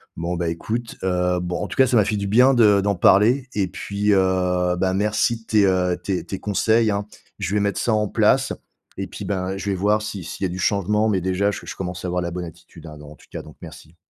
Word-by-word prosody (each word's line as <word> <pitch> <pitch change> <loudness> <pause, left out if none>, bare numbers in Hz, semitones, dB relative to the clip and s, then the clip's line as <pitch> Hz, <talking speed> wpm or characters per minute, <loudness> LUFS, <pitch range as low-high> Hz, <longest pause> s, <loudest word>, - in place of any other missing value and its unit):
Bon, 85 +1 -3
bah, 85 -1 -2
écoute, 110 +8 -4
heu, 90 -1 0
bon, 90 0 -3
en - - -3
tout - - -7
cas, 130 - +5
ça 120 - +2
m'a 105 - +4
fait 105 - -1
du 100 -1 -2
bien 125 +6 +5
de 105 -5 +5
d'en 100 0 0
parler 115 +9 +4
et 100 -3 +1
puis, 100 +2 -1
heu, 90 -2 +1
bah, 95 +1 0
merci 105 +3 +1
de - - -22
tes, 105 -2 +3
heu, 90 -2 +1
tes 90 0 -3
tes 95 - -6
conseils, 110 +2 +1
hein. 100 0 -2 0.3
Je 95 -1 -3
vais - - +3
mettre 100 0 -1
ça 120 - 0
en 105 -1 +1
place - - +2 0.4
et - - -4
puis, - - -8
ben, 95 -1 -3
je 100 +1 -4
vais 95 - 0
voir 105 +3 +1
si, 100 -4 -6
s'il 90 +4 -5
y - - +1
a - - -7
du 90 - -6
changement, 105 +3 +1
mais, 95 -3 +1
déjà 95 +3 0
je - - -6
je - - -7
commence 90 -1 -5
à - - -1
avoir 90 0 -1
la 85 -1 -3
bonne 90 0 -5
attitude, 85 0 -14
hein. 75 -1 -10
Donc, 75 0 -12
en - - -12
tout - - -21
cas, - - -6
donc 75 - -15
merci. 80 +2 -12
95 Hz, 270 wpm, -22 LUFS, 90-105 Hz, 0.4 s, cas